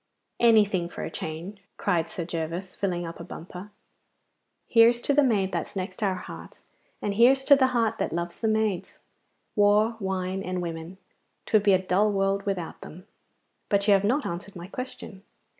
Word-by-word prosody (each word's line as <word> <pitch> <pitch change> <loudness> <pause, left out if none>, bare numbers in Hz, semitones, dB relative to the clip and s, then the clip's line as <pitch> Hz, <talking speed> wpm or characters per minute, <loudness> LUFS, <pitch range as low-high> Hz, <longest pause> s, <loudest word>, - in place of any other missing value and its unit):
'Anything 205 -7 +4
for - - -7
a - - -5
change,' 170 +6 -6 0.2
cried 170 -4 0
Sir 170 - -5
Gervas, 170 +2 -4
filling 175 -3 -2
up 165 0 -8
a - - -6
bumper. 180 +4 -9 1.0
'Here's 235 +1 +5
to 285 - +2
the 290 - +5
maid 205 -8 +2
that's 170 +2 -4
next 190 +3 -5
our 195 -3 +1
heart, 185 - -10 0.5
and 205 - 0
here's 255 +5 +5
to 280 - +7
the 265 -1 +3
heart 230 -3 0
that - - -1
loves 170 +1 -4
the 225 - 0
maids! 215 -4 -1 0.6
War, 210 +2 +3
wine, 190 -1 -2
and 185 -1 -3
women, 165 +1 -6 0.5
'twould 215 - +3
be 200 -1 +4
a - - +6
dull 190 +3 +2
world 195 0 0
without 180 -4 -3
them. 180 +4 -11 0.6
But 200 0 +1
you 205 - +7
have 195 0 +3
not 260 +8 +1
answered 175 +4 -6
my 175 -1 -7
question. 210 -2 -8
195 Hz, 175 wpm, -26 LUFS, 180-215 Hz, 1.0 s, to